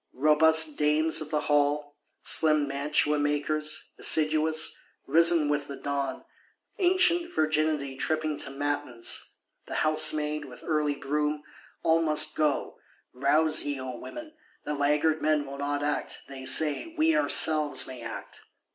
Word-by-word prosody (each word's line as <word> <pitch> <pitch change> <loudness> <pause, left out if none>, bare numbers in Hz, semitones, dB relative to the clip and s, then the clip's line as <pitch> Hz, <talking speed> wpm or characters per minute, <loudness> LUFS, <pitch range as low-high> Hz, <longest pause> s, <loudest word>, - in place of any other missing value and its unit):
Robust 155 +2 +4
Dames 155 +2 +2
of 155 - -7
the 150 -1 -1
Halle, 145 0 0 0.3
slim 155 -2 +4
Mantua 145 +2 0
makers, 150 +1 -2
assiduous, 155 0 +2 0.3
risen 165 -1 +3
with 145 -1 -2
the 140 - -7
dawn; 140 0 -4 0.5
ancient 355 -2 +2
Virginity 155 - -1
tripping 155 +2 -2
to - - -2
matins; 145 -4 -4 0.3
the - - -6
Housemaid, 155 -1 +1
with 125 - -14
early 150 -2 -1
broom; 150 +1 -3 0.4
all 165 0 +2
must 155 -1 +3
go. 150 -2 -2 0.3
Rouse 155 +4 +2
ye, 145 -2 -4
O 130 -2 -7
women; 310 +1 -10 0.3
the 150 - -4
laggard 150 +2 0
men 155 -1 0
will 140 0 -9
not 145 0 -3
act; 145 0 -3
they 135 -1 -7
say, 155 - +2
we 320 +1 +2
ourselves 155 - +3
may 130 -2 -9
act! 115 0 -9
150 Hz, 135 wpm, -26 LUFS, 145-155 Hz, 0.5 s, Robust